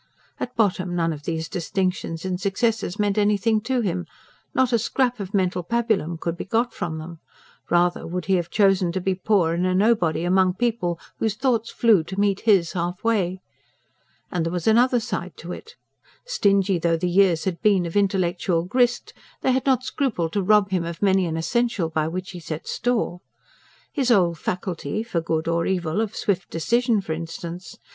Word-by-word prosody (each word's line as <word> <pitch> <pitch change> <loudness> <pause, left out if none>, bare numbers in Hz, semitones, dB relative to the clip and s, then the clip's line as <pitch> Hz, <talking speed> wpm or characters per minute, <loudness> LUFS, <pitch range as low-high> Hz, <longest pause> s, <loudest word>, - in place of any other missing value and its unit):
At 250 - -5
bottom, 185 -5 +1
none 165 -1 +1
of 145 -1 -10
these 160 -1 -2
distinctions 180 -1 -2
and 185 0 -2
successes 210 -1 0
meant 205 -1 +1
anything 210 +1 +2
to 255 +2 0
him; 180 -4 -2 0.4
not 260 -1 +1
a 235 - +4
scrap 245 +1 0
of 195 -2 -5
mental 185 -2 +1
pabulum 215 -5 0
could 170 +1 -3
be - - -5
got 230 +4 0
from 160 -2 -4
them: 160 +1 -8 0.5
rather 175 0 +2
would 180 0 -4
he 190 - +1
have 175 -2 0
chosen 195 -4 +3
to 190 - -1
be 190 +1 0
poor 185 -3 +1
and 170 +1 -1
a 185 - +1
nobody 185 -6 +2
among 185 +1 +3
people 205 -7 -1 0.2
whose 220 -2 0
thoughts 230 -2 0
flew 220 -8 +3
to 190 +3 -5
meet 200 -1 +2
his 195 -7 +3
half 175 +1 -3
way. 190 -5 0 0.9
And 175 -2 0
there 165 - -2
was 175 -2 -3
also 220 - +4
another 245 +2 +4
side 190 -6 -5
to 170 - -8
it. 455 - -9 0.5
Stingy 200 - +2
though 165 0 +1
the 180 - -1
years 175 -2 +3
had 180 -3 -3
been 195 -4 +3
of 170 - -6
intellectual 185 -3 +1
grist, 245 +6 +1 0.3
they 260 - +2
had 260 +1 0
not 260 -2 +3
scrupled 220 - -1
to 205 - +1
rob 205 0 +3
him 180 -3 +1
of 170 +2 -5
many 190 -2 +3
an 160 -1 -2
essential 205 0 0
by 155 -1 0
which 180 +3 -5
he 180 - -8
set 160 -1 -6
store. 235 -7 -1 0.7
His 270 -5 0
old 175 -8 +3
faculty 185 +4 -3
for 185 -8 -2
good 160 -1 -2
or 165 0 +1
evil 180 0 0
of 220 -1 -3
swift 190 -3 -1
decision, 230 +6 +1
for 160 -4 -4
instance. 170 +2 -7
185 Hz, 190 wpm, -23 LUFS, 170-220 Hz, 0.9 s, a